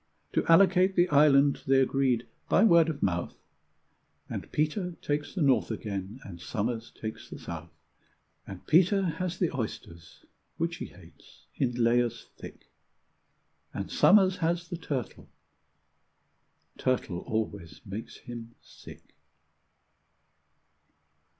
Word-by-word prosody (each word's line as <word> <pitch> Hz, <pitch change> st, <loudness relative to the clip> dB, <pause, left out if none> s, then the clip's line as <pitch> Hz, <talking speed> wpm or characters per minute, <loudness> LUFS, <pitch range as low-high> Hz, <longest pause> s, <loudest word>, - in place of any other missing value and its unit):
To -, -, +2 dB
allocate 185 Hz, +2 st, +5 dB
the 175 Hz, 0 st, +4 dB
island 140 Hz, -1 st, +5 dB
they 135 Hz, 0 st, +5 dB
agreed 130 Hz, -3 st, +1 dB, 0.2 s
by 195 Hz, -, +4 dB
word 170 Hz, -6 st, +6 dB
of 150 Hz, -3 st, -4 dB
mouth, 85 Hz, -2 st, -1 dB, 1.0 s
And -, -, -6 dB
Peter 175 Hz, +4 st, -1 dB
takes 145 Hz, +3 st, -3 dB
the 180 Hz, -, +1 dB
north 135 Hz, -2 st, +3 dB
again, 100 Hz, +2 st, -5 dB
and 85 Hz, -4 st, -10 dB
Somers 115 Hz, +4 st, -3 dB
takes 110 Hz, 0 st, -7 dB
the -, -, -8 dB
south; 85 Hz, 0 st, -8 dB, 0.8 s
And 95 Hz, -2 st, -9 dB
Peter 190 Hz, +4 st, +4 dB
has 180 Hz, +1 st, -2 dB
the 175 Hz, -6 st, -1 dB
oysters, 85 Hz, -8 st, -7 dB, 0.3 s
which -, -, -2 dB
he -, -, -5 dB
hates, -, -, -18 dB
in 125 Hz, -3 st, -1 dB
layers 120 Hz, 0 st, +1 dB
thick, -, -, -12 dB, 1.0 s
And -, -, -4 dB
Somers 190 Hz, -2 st, +5 dB
has 170 Hz, +1 st, -1 dB
the 175 Hz, -, -4 dB
turtle 140 Hz, -7 st, -5 dB, 1.5 s
turtle 120 Hz, -8 st, -1 dB
always 100 Hz, -3 st, -4 dB
makes 105 Hz, +3 st, -7 dB
him 120 Hz, -1 st, -9 dB
sick. -, -, -15 dB
135 Hz, 120 wpm, -28 LUFS, 110-170 Hz, 1.5 s, word